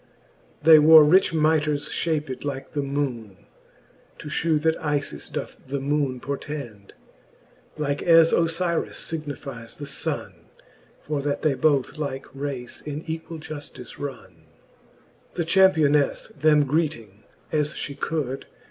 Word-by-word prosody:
They 160 0 +9
wore 155 0 +9
rich 185 +5 +5
mitres 150 -2 +1
fhaped 150 -5 -2
like 140 -2 -5
the 145 - -1
moone, 130 -8 -4 0.7
To 150 - -8
{hew, 160 +1 +1
that 160 +1 +1
IJis 145 - -3
doth - - -5
the 140 +2 -2
moone 140 -2 -1
portend 135 -7 -6
j - - -32 0.8
Like 145 0 -1
as 165 -1 +6
Ofyris 170 0 0 0.2
(ignifies 140 -7 -6
the 145 - -6
funne - - -3 0.3
j - - -27 0.4
For 150 -2 -3
that 145 0 -2
they 155 - +3
both 140 +2 +1
like 135 -3 -4
race 135 -3 -5
in 150 0 -5
equall 160 0 -6
juftice 145 -5 -9
runne. 140 -2 -7
V. - - -26 1.0
The 170 - -1
Championefle 160 -2 +3
them 150 -1 +5
greeting 130 - -2 0.3
as 150 -1 0
flie 140 - -5
could. 140 -4 -3
145 Hz, 135 wpm, -24 LUFS, 135-160 Hz, 1.0 s, They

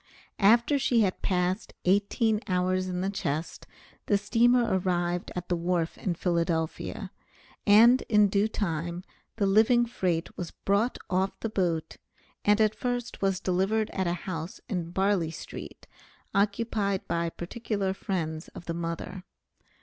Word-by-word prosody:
After 235 +7 +5
she 245 -3 +3
had 190 -3 0
passed 185 +2 -1
eighteen 205 +3 +2
hours 185 0 +1
in 180 -1 -2
the 195 +1 -1
chest, 155 -4 -3 0.4
the 205 - +4
steamer 235 +4 +3
arrived 175 -1 -1
at 180 -1 -4
the 175 - +1
wharf 170 -1 -1
in 180 -3 -2
Philadelphia, 170 -2 -1 0.6
and 230 +5 +7
in 210 -2 +5
due 200 +2 +2
time 170 -4 -3 0.3
the 205 - +1
living 220 +5 +4
freight 180 -8 -2
was 175 -2 -5
brought 205 +5 0
off 190 +1 0
the 225 - -2
boat, 175 -6 -1 0.5
and 210 +1 +4
at 215 -1 +4
first 245 0 -3
was 195 -1 +1
delivered 195 +4 0
at 190 -1 -1
a 170 - +1
house 170 +2 -5
in 180 -7 -3
Barley 190 -2 +1
street, 165 - -9 0.5
occupied 200 -1 0
by 170 0 0
particular 195 +2 -3
friends 165 -5 -3
of 175 - -9
the 170 - -3
mother. 170 +2 -5
190 Hz, 140 wpm, -28 LUFS, 175-215 Hz, 0.6 s, and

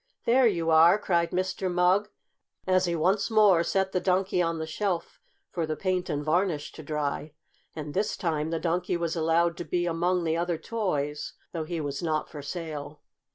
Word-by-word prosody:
"There 250 +1 +5
you 170 -6 0
are!" 165 +4 +7
cried 170 -5 +1
Mr. 185 0 -1
Mugg, 180 +4 +3 0.6
as 185 0 +3
he 170 -1 -1
once 190 +7 +1
more 210 -6 +5
set 190 +2 0
the 185 - +1
Donkey 185 0 +1
on 165 -1 0
the 160 - -3
shelf 175 +1 -3 0.3
for 165 -3 -2
the 155 - -2
paint 185 +1 -1
and 145 0 -2
varnish 160 -2 0
to - - -10
dry. 150 0 -3 0.4
And 150 -2 -6
this 205 +2 -1
time 160 -3 -1
the 165 - -1
Donkey 175 +1 0
was 170 -1 -2
allowed 165 +1 +2
to - - -4
be 175 0 -1
among 175 +1 0
the 160 -1 0
other 170 0 -1
toys, 150 -10 -2 0.2
though 165 -2 -3
he 170 +1 -3
was 145 -2 -3
not 155 -3 -1
for 150 - -7
sale. 150 -1 -6
170 Hz, 190 wpm, -27 LUFS, 160-185 Hz, 0.6 s, are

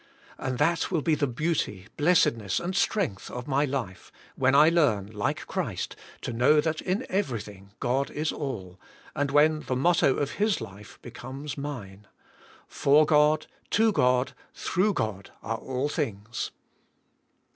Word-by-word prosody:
And 130 -1 -2
that 165 +5 +2
will 165 -6 0
be 160 - +2
the 145 -1 +1
beauty, 125 - -2
blessedness 115 - +2
and 180 +2 -3
strength 195 - 0
of 125 0 -6
my 140 +1 +2
life, 130 -10 -4 0.2
when 135 +1 +3
I 150 +2 +8
learn, 125 - +2
like 105 -2 -2
Christ, - - -3 0.3
to 125 - -4
know 125 +6 +4
that 155 +1 0
in 195 +8 -1
every 185 - -1
thing 100 -1 -12
God 130 +3 0
is 155 +1 -2
all, 95 - -5 0.4
and 145 0 0
when 155 +2 +4
the 130 - -3
motto 140 0 +3
of 140 -1 -1
His 215 -2 +2
life 100 +2 -10
be 120 - -9
comes 135 +5 -7
mine: 105 -9 -7 0.6
"For 150 +2 +4
God, 150 0 +4 0.2
to 225 +1 +4
God, 125 -7 +2 0.2
through 195 +2 +1
God, 105 -3 -3
are 115 +2 -2
all 130 +2 -2
things." 115 -7 -3
140 Hz, 155 wpm, -27 LUFS, 115-155 Hz, 0.6 s, I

